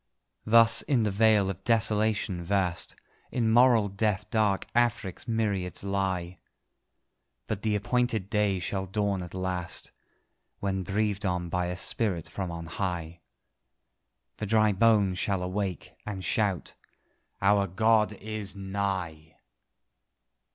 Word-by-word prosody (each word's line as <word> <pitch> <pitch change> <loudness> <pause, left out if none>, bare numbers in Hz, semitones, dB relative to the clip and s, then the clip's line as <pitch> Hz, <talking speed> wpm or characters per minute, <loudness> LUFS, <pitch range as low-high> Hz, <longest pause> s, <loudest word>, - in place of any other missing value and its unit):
Thus, 115 +1 +6
in 130 -6 +1
the 105 - 0
vale 105 -1 +4
of 95 0 -10
desolation 110 -5 +1
vast, 90 -1 -1 0.4
In 115 -3 +1
moral 120 -2 +5
death 100 0 -1
dark 105 -3 +1
Afric's 120 -4 0
myriads 105 -6 -1
lie; 95 -3 -2 1.1
But 105 -2 -4
the 105 -1 0
appointed 115 -1 0
day 105 -3 +1
shall 95 +1 -3
dawn 100 0 -1
at 90 0 -8
last, 90 -2 -3 0.7
When 95 -1 -1
breathed 105 +2 -1
on 90 -2 -1
by 90 +1 -1
a 90 0 -4
spirit 95 -4 0
from 95 -2 -4
on 85 -1 -6
high, 85 -1 -4 1.2
The 105 - -4
dry 110 0 +4
bones 100 -3 +3
shall 95 -3 0
awake, 95 0 -3
and 100 -3 -5
shout 100 -7 0 0.7
"Our 100 0 +3
God 110 +3 +2
is 105 -1 -5
nigh!" 95 -5 -4
100 Hz, 125 wpm, -28 LUFS, 95-110 Hz, 1.2 s, Thus